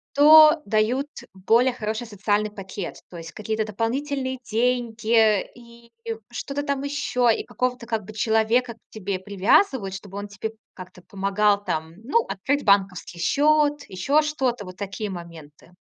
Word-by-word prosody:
то 305 Hz, +2 st, +8 dB
дают 225 Hz, +7 st, +1 dB, 0.3 s
более 225 Hz, +7 st, +3 dB
хороший 220 Hz, 0 st, -4 dB
социальный 210 Hz, 0 st, -1 dB
пакет. 195 Hz, -2 st, -7 dB
То 175 Hz, -, -10 dB
есть 165 Hz, 0 st, -9 dB
какие-то 220 Hz, +2 st, -3 dB
дополнительные 260 Hz, +5 st, -2 dB
деньги 225 Hz, -2 st, +2 dB
и 235 Hz, -1 st, -17 dB, 0.4 s
что-то 275 Hz, +4 st, -4 dB
там 280 Hz, -1 st, -2 dB
еще. 280 Hz, -4 st, 0 dB
И -, -, -5 dB
какого-то 250 Hz, -1 st, -3 dB
как 220 Hz, -3 st, -2 dB
бы 215 Hz, -, -10 dB
человека 225 Hz, +3 st, +1 dB
к -, -, -28 dB
тебе 200 Hz, -3 st, -4 dB
привязывают, 200 Hz, -, +2 dB
чтобы 195 Hz, 0 st, -9 dB
он 205 Hz, -, -6 dB
тебе 205 Hz, +2 st, -5 dB, 0.2 s
как-то 185 Hz, 0 st, -12 dB
помогал 200 Hz, +1 st, +1 dB
там, 160 Hz, -3 st, -3 dB
ну, 455 Hz, -, +1 dB
открыть 285 Hz, +9 st, -1 dB
банковский 195 Hz, -3 st, +1 dB
счет, 295 Hz, -, +2 dB
еще 275 Hz, +12 st, +1 dB
что-то. 260 Hz, -8 st, -2 dB
Вот 185 Hz, 0 st, -11 dB
такие 205 Hz, +2 st, -5 dB
моменты. 165 Hz, -4 st, -11 dB
220 Hz, 145 wpm, -24 LUFS, 195-255 Hz, 0.4 s, то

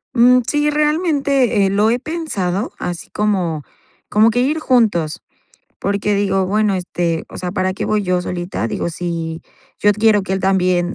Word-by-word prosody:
Mm, 250 Hz, +1 st, +6 dB
sí, 295 Hz, +2 st, +1 dB
realmente, 290 Hz, -, +1 dB
eh, 195 Hz, -, +2 dB
lo 210 Hz, +2 st, +3 dB
he 240 Hz, +2 st, +1 dB
pensado, 235 Hz, -, -3 dB
así 175 Hz, -2 st, -5 dB
como 185 Hz, -8 st, -1 dB, 0.5 s
como 215 Hz, +2 st, +4 dB
que 245 Hz, +2 st, +1 dB
ir 300 Hz, +5 st, 0 dB
juntos. 205 Hz, -, +1 dB, 0.6 s
Porque 200 Hz, +1 st, 0 dB
digo: 195 Hz, -2 st, +1 dB
"Bueno, 210 Hz, 0 st, +1 dB
este, 175 Hz, -2 st, -2 dB
o -, -, -10 dB
sea, 180 Hz, -, -4 dB
¿para 185 Hz, 0 st, -1 dB
qué -, -, -4 dB
voy 215 Hz, -1 st, 0 dB
yo 180 Hz, -1 st, +1 dB
solita?", 175 Hz, -10 st, -3 dB
digo, 170 Hz, -, -3 dB
si 165 Hz, -1 st, -4 dB, 0.4 s
yo 205 Hz, -, +5 dB
quiero 210 Hz, -1 st, +3 dB
que 190 Hz, -, -4 dB
él 190 Hz, -, 0 dB
también 185 Hz, -1 st, +1 dB
200 Hz, 170 wpm, -18 LUFS, 180-240 Hz, 0.6 s, Mm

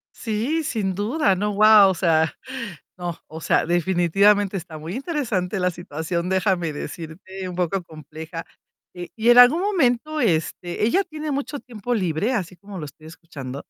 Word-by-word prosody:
Sí, 240 Hz, +9 st, -1 dB
sin 205 Hz, -9 st, -2 dB
duda, 205 Hz, -, +1 dB
¿no? 205 Hz, +3 st, -1 dB
Guau. 210 Hz, -1 st, +7 dB
O -, -, -1 dB
sea, 160 Hz, -2 st, +2 dB, 0.6 s
no, 175 Hz, -2 st, -4 dB
o 160 Hz, +1 st, -9 dB
sea, -, -, +2 dB
definitivamente 190 Hz, +4 st, +2 dB
está 165 Hz, -3 st, -8 dB
muy 160 Hz, +4 st, -7 dB
interesante 230 Hz, -, -2 dB
la 180 Hz, 0 st, +1 dB
situación, 170 Hz, +1 st, -4 dB
déjame 185 Hz, -4 st, +1 dB
decirte, 170 Hz, +5 st, -7 dB
un 180 Hz, -, -6 dB
poco 180 Hz, +1 st, -1 dB
compleja. 160 Hz, +1 st, -9 dB, 0.5 s
Eh, 175 Hz, -1 st, -8 dB
y 230 Hz, +1 st, +1 dB
en 240 Hz, -, +7 dB
algún 250 Hz, +8 st, +8 dB
momento, 310 Hz, -, +1 dB
este, 175 Hz, -, -1 dB
¿ella 375 Hz, -, +2 dB
tiene 310 Hz, -3 st, -6 dB
mucho 280 Hz, +1 st, -3 dB
tiempo 240 Hz, 0 st, -5 dB
libre, 190 Hz, +3 st, 0 dB
así 185 Hz, -6 st, -3 dB
como 195 Hz, +1 st, -10 dB
lo 155 Hz, -, -5 dB
estoy 155 Hz, +2 st, -13 dB
escuchando? 145 Hz, -5 st, -9 dB
190 Hz, 160 wpm, -23 LUFS, 165-230 Hz, 0.6 s, algún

